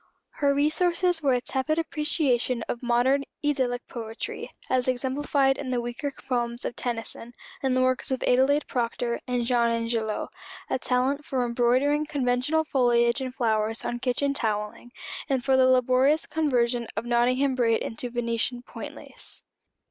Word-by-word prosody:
Her 280 -1 +3
resources 340 +3 +2
were 275 -3 +3
a 245 - 0
tepid 265 +4 -1
appreciation 300 -6 0
of 235 - -4
modern 250 +3 +2 0.2
idyllic 255 -4 0
poetry, 225 -1 -6 0.2
as 255 -1 +1
exemplified 270 +1 +1
in 265 - -4
the 250 -1 0
weaker 240 +4 -4 0.2
poems 240 -1 -1
of - - -3
Tennyson, 235 0 -4 0.3
and 260 -1 +1
the 255 - +3
works 255 0 +1
of 260 -1 -1
Adelaide 265 +4 +3
Proctor 235 -1 -2
and 245 -1 0
Jean 240 -1 +2
Ingelow, 230 -2 -1 0.4
a - - +1
talent 260 +4 0
for 260 -3 -1
embroidering 255 +5 +2
conventional 280 +2 +1
foliage 240 -3 +2
and 260 -1 -3
flowers 225 -2 0
on 240 - -2
kitchen 265 +3 0
towelling, 215 -1 -3 0.4
and 265 -2 0
for 265 -1 +4
the 260 0 +5
laborious 255 +4 +3
conversion 245 -6 0
of 220 - -2
Nottingham 250 +3 +2
braid 230 -3 +2
into 235 +2 -3
Venetian 240 0 -2
point - - -8
lace. - - -3
250 Hz, 150 wpm, -26 LUFS, 240-275 Hz, 0.4 s, the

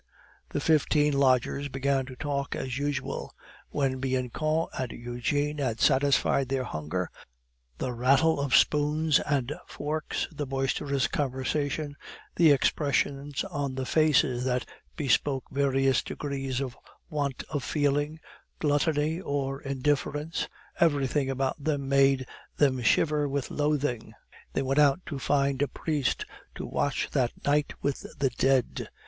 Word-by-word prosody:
The - - -2
fifteen 150 -1 +3
lodgers 140 +1 +2
began 135 0 0
to 130 - -8
talk 140 0 -2
as 130 0 -3
usual. 145 -1 -3 0.3
When 135 -2 0
Bianchon 135 +5 0
and 130 -2 -3
Eugene 145 +5 -2
had 120 -5 -1
satisfied 135 -1 +3
their 135 -1 0
hunger, 85 -3 -3 0.7
the 125 - -2
rattle 135 +6 +3
of 140 -2 +2
spoons 150 0 +3
and 140 -1 -1
forks, 150 +1 -3
the 145 - -4
boisterous 135 +1 0
conversation, 145 +2 -2 0.4
the 165 -2 +6
expressions 140 0 +1
on 145 -8 -3
the 130 -1 -2
faces 135 -5 +3
that 125 -1 0 0.3
bespoke 135 -1 +1
various 135 -2 +2
degrees 135 -2 -3
of 130 -2 -4 0.3
want 145 -3 -2
of 145 -4 -2
feeling, 145 +1 0 0.4
gluttony, 150 +2 +1
or 140 -4 -2
indifference, 145 +3 -1 0.3
everything 145 -4 +2
about 135 +2 -2
them 145 -3 -1
made 135 -1 +4 0.3
them 130 -3 +3
shiver 150 +5 +2
with 140 -1 -2
loathing. 145 -5 -1 0.4
They 135 - 0
went 135 +2 +1
out 145 +2 +4
to 140 -4 -5
find 140 0 +1
a 145 - +3
priest 150 -3 -1 0.3
to - - -5
watch 145 - -1
that 125 -4 -1
night 145 +1 +2
with 140 -1 -2
the 135 -2 +1
dead. 130 +1 +1
140 Hz, 130 wpm, -28 LUFS, 130-145 Hz, 0.7 s, the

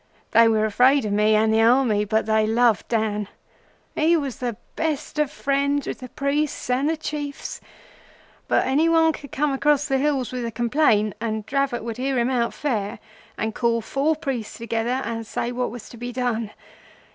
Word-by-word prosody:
They 230 +1 +6
were 220 -1 +2
afraid 250 +5 +4
of 205 - -1
me 210 +1 +3
and 220 +1 +3
the 220 - +4
Army, 225 -3 +3
but 220 +1 0
they 220 0 +2
loved 230 -1 +2
Dan. 215 -3 -1 0.7
He 330 +2 +3
was 275 -5 -3
the 240 -4 -3 0.2
best 310 -1 -2
of 300 -2 +2
friends 280 +1 0
with - - -5
the 255 - -9
priests 285 -1 -1
and 265 +4 +1
the 325 - 0
Chiefs; 290 -2 -5 0.9
but - - +2
any 295 +5 +2
one 325 -1 +4
could 285 -2 -10
come 295 +1 0
across 290 +1 +2
the 270 -2 +1
hills 275 -3 0
with 250 -1 -4
a 230 - -3
complaint 225 -3 +2
and 220 -2 -2
Dravot 275 -3 -1
would 230 -1 -5
hear 265 +1 -1
him 240 +2 +1
out 235 -2 +1
fair, 215 -8 -2 0.4
and 220 0 -2
call 235 0 +1
four 275 +7 0
priests 265 -7 -4
together 235 +3 -2
and 225 -1 -4
say 235 - -3
what 250 0 -2
was 235 -1 -9
to 235 - -12
be 245 +1 -5
done. 235 -3 -1
245 Hz, 190 wpm, -23 LUFS, 225-280 Hz, 0.9 s, They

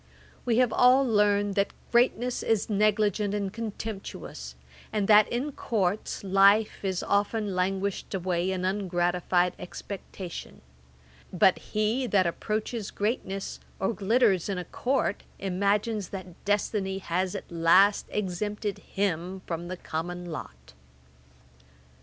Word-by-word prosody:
We 235 -2 +2
have 245 -3 +3
all 255 +2 +5
learned 205 -2 +3
that 200 0 0 0.2
greatness 245 0 +2
is 220 -1 0
negligent 210 0 +2
and 200 -1 -2
contemptuous, 205 - -6 0.4
and 205 -2 0
that 210 0 +7
in 260 +5 -1
Courts 205 -7 -2
life 200 +3 +4
is 190 -2 -1
often 205 0 0
languished 195 +2 -1
away 180 -1 0
in 185 -1 -1
ungratified 180 -2 +1
expectation; 185 -1 -8 0.7
but 190 +1 +4
he 220 +4 -1
that 195 -5 +3
approaches 215 +5 -2
greatness, 200 -2 -3 0.2
or 195 +4 0
glitters 210 -3 +2
in 195 - -1
a 180 - -4
Court, 250 +1 -1 0.2
imagines 200 +2 0
that 185 -3 -9
destiny 205 -1 0
has 185 0 -2
at - - -7
last 170 +5 +4
exempted 205 +1 -3
him 185 -1 -2
from 170 0 -4
the 185 +1 -5
common 175 +2 -4
lot. 65 - -9
200 Hz, 120 wpm, -27 LUFS, 185-215 Hz, 0.7 s, that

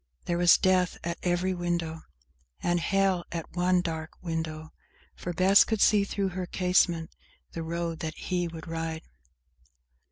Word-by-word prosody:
There 175 0 -1
was 175 -1 +7
death 185 -1 +2
at 170 0 -3
every 180 +1 0
window; 170 -2 -2 0.6
And 175 0 +2
hell 195 0 +1
at 165 0 -6
one 180 0 +3
dark 160 -2 -4
window; 160 -2 -4 0.4
For 175 - -5
Bess 185 +4 +6
could 220 -2 -2
see, 205 -1 +4
through 200 -1 -1
her 180 0 -4
casement, 180 -3 +1 0.4
the 165 - -5
road 165 0 -3
that 160 -1 -4
he 175 -1 -2
would 165 -1 -9
ride. 165 -1 -4
175 Hz, 150 wpm, -28 LUFS, 165-185 Hz, 0.6 s, was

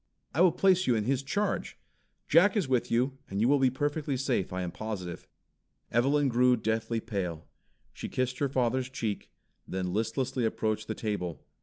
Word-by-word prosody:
I 155 - +2
will 180 -1 +7
place 185 +1 +3
you 125 - +4
in 110 - +1
his 130 +3 +1
Charge. 200 +8 -2 0.5
John 175 +7 +6
is 195 -9 +1
with 130 -2 +1
you, 130 +3 +1
and 100 - -3
you 115 - +3
will 140 +1 +4
be 130 -1 +4
perfectly 145 +1 -1
safe, 125 -7 0
I 90 0 -2
am 90 - -3
positive." 95 -5 -6 0.6
Evelyn 140 +5 +3
grew 125 0 +4
deathly 110 +1 -1
pale. 95 -8 -4 0.5
She - - -6
kissed 130 0 -1
her 140 - +1
father's 130 0 0
cheek, 110 -6 -3 0.4
then 90 -1 -3
listlessly 125 +4 -1
approached 110 -1 -1
the 110 - -3
table. 100 -7 -3
125 Hz, 175 wpm, -29 LUFS, 110-135 Hz, 0.6 s, will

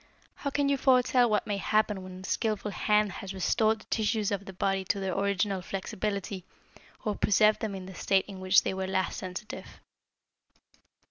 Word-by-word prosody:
How 280 - -4
can 285 0 +1
you 280 0 +2
foretell 250 -2 +4
what 210 -1 +1
may 205 -1 -1
happen 210 -1 +1
when 185 0 -9
a - - -12
skilful 210 0 -1
hand 210 0 +2
has 195 +2 -7
restored 215 +3 +2
the - - -16
tissues 215 -1 +1
of 200 -1 -2
the 190 - -7
body 195 +1 0
to 200 - 0
their 190 -2 -2
original 200 -1 0
flexibility, 195 0 -3 0.6
or 210 - +1
preserved 210 +1 +4
them 215 -3 -3
in 190 -1 -7
the 190 - -9
state 190 +1 +1
in 195 -2 -8
which 185 +1 +5
they - - -1
were 190 0 -3
last 190 -1 -1
sensitive?" 185 +4 -7
200 Hz, 185 wpm, -29 LUFS, 190-215 Hz, 0.6 s, which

